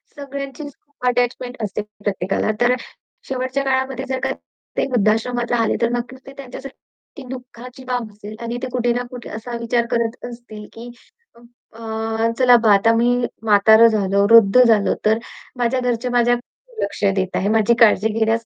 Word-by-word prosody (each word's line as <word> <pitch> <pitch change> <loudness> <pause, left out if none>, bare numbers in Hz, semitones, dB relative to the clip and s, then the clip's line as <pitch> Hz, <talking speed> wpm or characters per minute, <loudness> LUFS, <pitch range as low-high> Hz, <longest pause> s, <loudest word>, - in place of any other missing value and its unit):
सगळ्यांचीच 280 +1 -7
खूप 285 -4 -8
अटॅचमेंट 245 0 -1
असते 210 +1 -3
प्रत्येकाला. 205 -1 -2
तर 245 +1 +4 0.5
शेवटच्या 260 +1 -2
काळामध्ये 265 0 -1
जर 260 - -1
का - - 0 0.5
ते - - +2
वृद्धाश्रमात 235 +2 0
राहले, 230 -2 +1
तर 235 - +2
नक्कीच 250 +2 -5
ते - - -9
त्यांच्यासाठी, 265 0 -9 0.4
ती 280 - -8
दुःखाची 250 0 -10
बाब 245 -4 -3
असेल 210 +1 -10
आणि 235 +1 -4
ते - - -1
कुठे 240 -1 +1
ना 245 +1 -2
कुठे 245 -1 -9
असा 235 +2 -6
विचार 235 0 0
करत 235 0 -2
असतील, 235 -3 -11
की 235 +2 -10 0.8
अ, 225 0 -2
चला 250 -1 +6
बा 215 -2 +6
आता 225 +3 +4
मी 240 +2 +2 0.3
म्हातारं 220 +2 +6
झालो, 200 -2 +1
वृद्ध 230 +1 +7
झालो. 220 -4 +3
तर 220 +1 +3 0.4
माझ्या 245 +1 0
घरचे 245 0 -1
माझ्या 245 0 +3 0.5
लक्ष 200 +1 -4
देत 190 -1 -2
आहे. 195 - 0
माझी 220 +1 +3
काळजी 220 -2 +5
घेण्यास 225 +1 +1
235 Hz, 165 wpm, -20 LUFS, 220-250 Hz, 0.8 s, वृद्ध